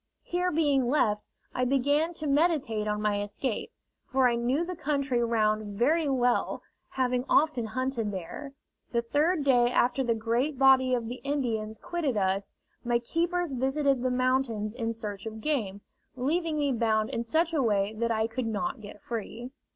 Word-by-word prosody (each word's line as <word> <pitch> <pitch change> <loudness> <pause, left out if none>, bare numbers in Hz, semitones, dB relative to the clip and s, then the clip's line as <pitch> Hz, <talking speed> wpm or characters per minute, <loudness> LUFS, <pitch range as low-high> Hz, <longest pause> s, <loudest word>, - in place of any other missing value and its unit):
Here 360 +1 -1
being 290 -6 +2
left, 215 -7 +1 0.3
I 250 - 0
began 285 +6 +1
to 310 - -5
meditate 280 -8 +1
on 210 0 -1
my 205 -1 +1
escape, 205 +3 -3 0.4
for 265 -1 +3
I 240 - +2
knew 250 +7 0
the 365 +1 -5
country 275 -6 0
round 215 -3 0
very 300 +6 +2
well, 245 -2 +1 0.3
having 250 -1 0
often 290 -7 +3
hunted 255 -1 -2
there. 200 - -7 0.4
The 235 0 +1
third 300 +6 +1
day 245 -3 +4
after 250 +2 +2
the 235 -2 +1
great 235 +6 0
body 260 -1 +5
of 235 -2 -3
the 245 +2 -6
Indians 230 -7 -2
quitted 300 -4 -2
us, 195 0 -1 0.3
my 240 -1 +2
keepers 335 +5 -1
visited 270 +1 +1
the 255 - +1
mountains 250 -4 0
in 230 -2 -2
search 210 -2 -6
of 220 0 -6
game, 215 -8 -2 0.3
leaving 310 +5 0
me 290 -2 +1
bound 220 -3 +1
in 230 - -1
such 320 +8 +1
a 305 - +2
way 205 -3 +1
that 230 +2 -1
I 220 -1 +1
could 230 +1 -3
not 240 +4 -2
get 205 0 -11
free. 235 +2 -5
250 Hz, 170 wpm, -28 LUFS, 220-285 Hz, 0.4 s, body